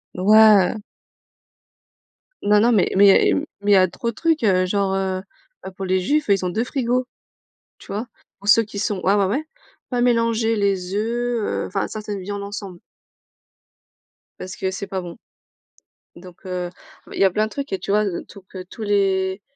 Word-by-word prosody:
Ouais. 210 +1 +5 1.7
Non, 210 0 +4
non, 235 +3 +4
mais 205 -5 +2
mais 200 0 +6
mmh, 295 - -1 0.2
mais 205 0 +1
il - - +7
y - - +7
a 185 0 +5
trop 235 +6 -4
de - - -22
trucs, 325 -6 0
heu, 185 -3 +3
genre, 195 0 0
heu 190 -1 -1 0.4
heu, 190 - -6
pour 195 - -5
les 185 0 +1
juifs, 290 +11 0
ils 195 -2 +2
ont - - 0
2 220 +6 -1
frigos. 250 -1 -1 0.7
Tu - - -17
vois? 215 +5 -3 0.3
Pour 200 - -8
ceux 230 +2 +6
qui 205 -1 -8
sont 205 -2 -2
ah 200 +2 +3
ouais, 200 - +3
ouais, 310 - -3 0.4
pas 245 -2 -1
mélanger 230 -2 +2
les 195 -3 -1
œufs, 235 +2 -1
heu, - - -2
enfin, 195 - -2
ça 215 - -6
ça 210 -1 -5
devient 200 +1 -5
l'ensemble 200 -3 -7 1.6
parce 185 - -7
que 190 0 -2
c'est 195 +1 -6
pas 190 -1 -4
bon. 175 -1 -9 1.0
Donc 180 +1 -14
heu, 180 -1 -4
ah, - - -22
bah, - - -12
il - - -4
y - - +6
a 190 - +5
plein 215 +4 0
de - - -9
trucs 280 +2 -6
et 190 - -1
tu - - -7
vois 210 +1 +3
heu, 180 - -4
tout 200 - -13
pe 185 -1 -8
tous 220 +5 -11
les 195 -2 0
200 Hz, 205 wpm, -21 LUFS, 190-225 Hz, 1.7 s, il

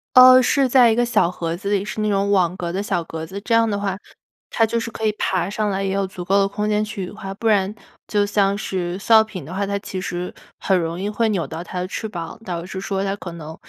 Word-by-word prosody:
哦， 255 0 +10
是 270 +1 +3
在 250 -1 +6
一 - - +2
个 240 +1 +2
小 215 -7 +2
盒 170 -2 -3
子 200 +3 -5
里， 200 -1 +1
是 215 - -4
那 215 - +1
种 200 0 +1
网 180 -2 +2
格 170 -2 -3
的 195 - -1
小 185 -5 -1
格 160 0 -6
子。 190 +4 -7
这 230 - -2
样 230 0 +4
的 205 -1 -1
话， 195 -2 -2 0.5
它 225 - +3
就 230 +1 -1
是 230 - -4
可 220 -1 -5
以 215 - +3
爬 180 -2 0
上 210 0 -1
来， 195 0 -1
也 195 - -1
有 195 -1 0
足 180 -1 -8
够 195 +2 +3
的 195 - +3
空 210 +1 -3
间 210 0 +1
去 205 -3 -5
羽 - - -9
化。 195 -2 -7
不 225 - -3
然 200 -1 +2 0.3
就 205 -1 +2
像 200 -1 +1
是 185 -3 -3
塑 225 +4 +1
料 220 0 +8
瓶 190 -8 -8
的 170 - -8
话， 200 +1 -1
它 200 - -1
其 190 -1 -6
实 180 -1 -4 0.3
很 190 - +2
容 165 +1 -3
易 200 - -2
会 220 +2 0
扭 190 -6 0
到 160 +1 -6
它 180 0 -6
的 180 - -2
翅 220 - -4
膀， 170 +1 -7
导 175 -3 -4
致 190 +1 -6
说 195 -1 -2
它 195 0 -1
可 175 -4 -8
能 160 -1 -8
195 Hz, 305 characters per minute, -21 LUFS, 180-215 Hz, 0.5 s, 哦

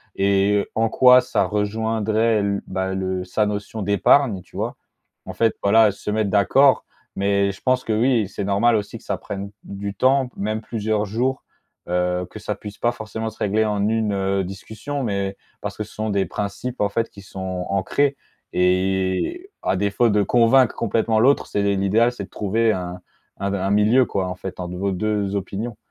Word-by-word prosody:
et 100 +1 +2
en 115 0 +2
quoi 125 +2 +7
ça - - 0
rejoindrait 110 +1 0
l 100 0 -1
bah, 95 0 -2
le 95 -1 -2
sa 95 +4 0
notion 105 +1 -4
d'épargne, 100 +2 +3
tu 90 - -21
vois? - - -2 0.5
En - - -7
fait, 115 -1 +1
voilà, 110 +1 +5
se 100 - -7
mettre 110 -1 0
d'accord, 130 +7 +4 0.3
mais 100 0 +1
je 95 - -14
pense 130 0 +1
que, 110 - 0
oui, 115 -1 +2
c'est 100 - -5
normal 100 +4 +3
aussi 105 -2 -3
que - - -18
ça - - -2
prenne 100 0 -6
d - - -24
du 100 0 -6
temps, 130 +5 +2
même 110 +2 -2
plusieurs 110 -1 -1
jours, 125 +6 -1 0.5
heu, 90 0 0
que - - -9
ça - - -3
puisse 105 0 -9
pas 120 - +2
forcément 110 -1 -5
se 110 - -16
régler 105 +2 +1
en 105 -1 0
une, 110 -1 +1
heu, 95 0 0
discussion, 110 +9 -6
mais 100 -3 -2 0.2
parce - - -5
que - - -2
ce - - -16
sont 110 0 -3
des 100 -1 +1
principes, 105 +5 -4
en 100 - +2
fait, 115 +3 -1
qui 100 - -13
sont 95 -1 -5
ancrés 140 +9 +1 0.4
et 95 - 0
à - - 0
défaut 100 +4 +2
de 105 -1 +3
convaincre 120 +3 +4
complètement 115 0 +1
l'autre, 135 +5 +3
c'est 100 - -1
l'idéal, 105 +5 +3
c'est 105 -5 -7
de - - -23
trouver 110 +3 +1
un 90 -1 -5 0.4
un 100 0 -2
d 100 - -1
un 95 +1 -1
milieu, 110 +5 +4
quoi, 95 -4 -2
en 90 - -4
fait, 95 +1 -8
entre 90 0 -5
vos 100 +1 -1
2 100 +1 -1
opinions. 100 +4 -4
105 Hz, 195 wpm, -22 LUFS, 95-115 Hz, 0.5 s, quoi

